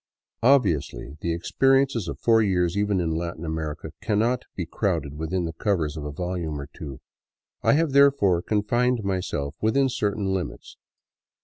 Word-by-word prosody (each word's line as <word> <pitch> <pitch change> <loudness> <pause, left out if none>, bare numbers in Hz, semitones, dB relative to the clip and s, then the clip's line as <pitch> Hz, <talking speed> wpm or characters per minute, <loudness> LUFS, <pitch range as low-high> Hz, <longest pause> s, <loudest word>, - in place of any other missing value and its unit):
Obviously, 80 - +2
the 85 - -1
experiences 135 +5 +2
of - - -4
four 115 -1 +4
years, 90 -4 +1
even 100 -1 +1
in 85 -2 0
Latin 85 0 -3
America, 80 -1 -4
cannot 110 +3 +1
be 90 - -3
crowded 80 -6 -2
within 80 +4 -2
the 80 - -4
covers 80 -4 -1
of 75 -2 -5
a 75 - -4
volume 85 -2 -3
or 70 - -6
two. 70 -4 -8 0.6
I - - +4
have, 160 0 +2
therefore, 135 -11 +4
confined 120 +4 +1
myself 90 -7 -2
within 135 +5 +3
certain 100 -4 -1
limits. 95 -2 -5
95 Hz, 150 wpm, -25 LUFS, 80-110 Hz, 0.6 s, four